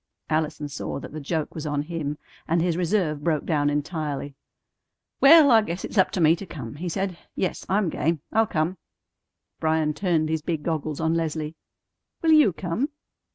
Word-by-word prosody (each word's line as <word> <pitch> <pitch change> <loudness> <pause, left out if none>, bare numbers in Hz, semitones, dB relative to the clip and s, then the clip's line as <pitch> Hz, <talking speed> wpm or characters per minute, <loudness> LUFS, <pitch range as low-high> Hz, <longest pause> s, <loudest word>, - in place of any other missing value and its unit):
Allison 155 -1 -1
saw 145 0 -5
that - - -9
the 155 - -5
joke 155 +1 -2
was 155 -1 -5
on 145 -1 -1
him, 150 -2 -4 0.3
and 170 +1 +2
his 170 0 +1
reserve 170 -4 0
broke 155 -3 0
down 145 -3 +1
entirely. 145 -1 -3 0.9
"Well, 290 0 +8
I 225 -1 +7
guess 180 -3 -4
it's 210 - -1
up 190 - +5
to - - -1
me 160 0 +5
to 195 - -7
come," 125 -9 -7
he 175 +3 -3
said. 190 0 -3 0.2
"Yes, 185 - -2
I'm 195 -2 +2
game. 160 -1 -1
I'll 220 0 +4
come." 165 +3 -1 0.8
Bryan 155 -1 +1
turned 160 -3 0
his 160 -1 0
big 160 -1 -3
goggles 155 -2 -2
on 160 0 +1
Leslie. 160 -1 -2 0.7
"Will 325 - +4
you 305 -10 +6
come?" 185 - -2
160 Hz, 180 wpm, -25 LUFS, 150-180 Hz, 0.9 s, Well